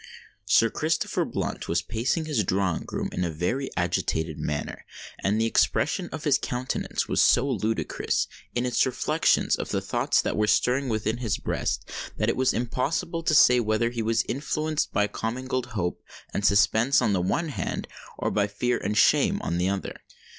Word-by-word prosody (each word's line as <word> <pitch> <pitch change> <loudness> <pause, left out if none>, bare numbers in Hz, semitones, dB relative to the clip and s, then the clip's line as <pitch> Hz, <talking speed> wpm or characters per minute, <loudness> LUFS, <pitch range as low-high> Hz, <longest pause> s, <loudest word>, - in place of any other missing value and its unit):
Sir 115 +3 +4
Christopher 160 +2 0
Blunt - - -4
was - - 0
pacing 125 +8 -1
his 145 -9 0
drawing 95 -3 -1
room - - -2
in 90 - -2
a 85 - 0
very 90 - -2
agitated 80 -3 -1
manner; 75 -1 -4 0.4
and 105 +3 0
the 115 - +2
expression 115 - +1
of - - -7
his - - +3
countenance 125 +1 -2
was - - +2
so 130 +3 +4
ludicrous, 115 -4 -1 0.3
in 120 +1 0
its 125 -1 +2
reflection 130 - +1
of - - -4
the - - 0
thoughts - - +1
that - - 0
were 105 0 +1
stirring 130 +4 +2
within 110 +1 -1
his 115 -4 -1
breast, - - -2 0.3
that - - +1
it - - +1
was 130 +1 +2
impossible 145 +9 -2
to 160 -1 +1
say 125 -4 +7
whether 115 +1 +1
he 120 -1 -3
was 115 +1 +1
influenced 155 +3 -1
by 105 - +2
commingled 125 +4 -3
hope 90 -2 -2 0.3
and 100 - +1
suspense 110 +6 +4
on 105 - +1
the 90 - +1
one 160 - 0
hand, 145 - -4 0.3
or - - -1
by 105 -1 +1
fear 120 +4 -1
and 105 +2 -2
shame - - +4
on 85 - -1
the 90 +1 +1
other. 100 -1 -3
115 Hz, 180 wpm, -26 LUFS, 100-130 Hz, 0.4 s, say